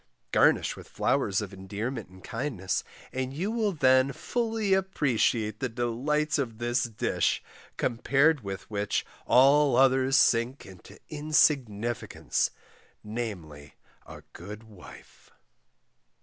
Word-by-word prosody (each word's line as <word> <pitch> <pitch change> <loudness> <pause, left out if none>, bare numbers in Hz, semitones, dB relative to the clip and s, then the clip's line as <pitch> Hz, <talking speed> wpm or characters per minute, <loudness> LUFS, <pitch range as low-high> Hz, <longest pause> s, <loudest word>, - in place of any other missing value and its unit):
Garnish - - +3
with - - -13
flowers 95 +1 0
of 100 -1 -8
endearment 105 +4 -5
and 95 0 -16
kindness, 115 -6 -3 0.3
and 130 +1 -3
you 190 +8 -2
will 225 -3 0
then 130 -4 +4
fully 225 - -1
appreciate 125 - +1
the 130 - -2
delights 135 +7 -1
of 115 -5 -3
a 120 0 -2 0.2
dish, 110 - 0 0.3
compared 140 +5 +2
with 95 -1 -6
which 105 -1 -2 0.2
all 140 +1 +5
others 130 +1 +4
sink 120 +2 +2
into 95 -2 -14
insignicance; 140 -7 0 0.5
namely 90 -11 -6 0.3
A - - -11
GOOD 105 +2 -9
WIFE. 105 -5 -15
125 Hz, 110 wpm, -28 LUFS, 105-145 Hz, 0.5 s, all